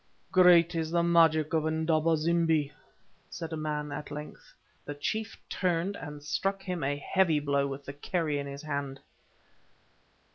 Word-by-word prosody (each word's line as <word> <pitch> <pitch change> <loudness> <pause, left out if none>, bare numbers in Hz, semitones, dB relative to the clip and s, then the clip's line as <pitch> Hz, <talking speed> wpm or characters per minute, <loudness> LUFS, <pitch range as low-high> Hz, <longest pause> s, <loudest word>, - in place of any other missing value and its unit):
"Great 175 -2 +6
is 160 -1 -2
the 170 0 +1
magic 165 -3 +4
of 160 -1 +1
Indaba 160 0 +2
zimbi!" 160 -2 +1 0.6
said 165 -1 -6
a - - -1
man, 150 -1 -3
at 145 +1 -6
length. 150 +1 -9 0.3
The 145 - -6
chief 220 +9 -3
turned 180 +2 -1
and 150 -4 -8
struck 195 +7 -2
him 180 -5 -3
a 140 +1 0
heavy 165 +1 +2
blow 140 -1 0
with 140 0 -7
the 140 - -6
kerrie 150 0 -2
in 140 - -4
his 140 +2 -8
hand. 140 -2 -4
155 Hz, 155 wpm, -29 LUFS, 145-170 Hz, 0.6 s, Great